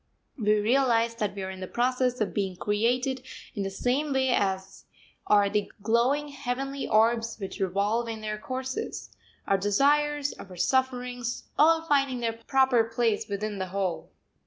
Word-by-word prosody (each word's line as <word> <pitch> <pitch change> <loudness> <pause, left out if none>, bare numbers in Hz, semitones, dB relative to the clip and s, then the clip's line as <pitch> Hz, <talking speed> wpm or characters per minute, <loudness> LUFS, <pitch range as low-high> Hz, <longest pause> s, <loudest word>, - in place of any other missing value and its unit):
We 215 -4 +2
realise 235 0 +2
that 210 -3 -3
we 195 - -4
are 190 - -4
in 190 - -9
the 185 - -5
process 250 +2 0
of 210 - 0
being 195 -3 -1
created 245 +7 0 0.3
in 205 - -3
the 195 - -1
same 260 +9 0
way 265 0 +2
as 190 -5 -1 0.4
are 205 -1 +5
the 205 +1 -1
glowing 250 +7 +2
heavenly 275 0 -3
orbs 225 +1 +2
which 195 +1 -6
revolve 200 +5 0
in 225 -1 -5
their 215 0 -4
courses, 260 +3 -5 0.3
our 195 - +2
desires, 290 +8 +2
our 185 -1 -10
sufferings, 250 +2 -1
all 325 +2 +5
finding 275 -5 +1
their 230 -1 -1
proper 245 +1 +3
place 230 -2 0
within 205 0 -3
the 190 - -2
whole. 185 -2 -3
230 Hz, 160 wpm, -27 LUFS, 205-260 Hz, 0.4 s, are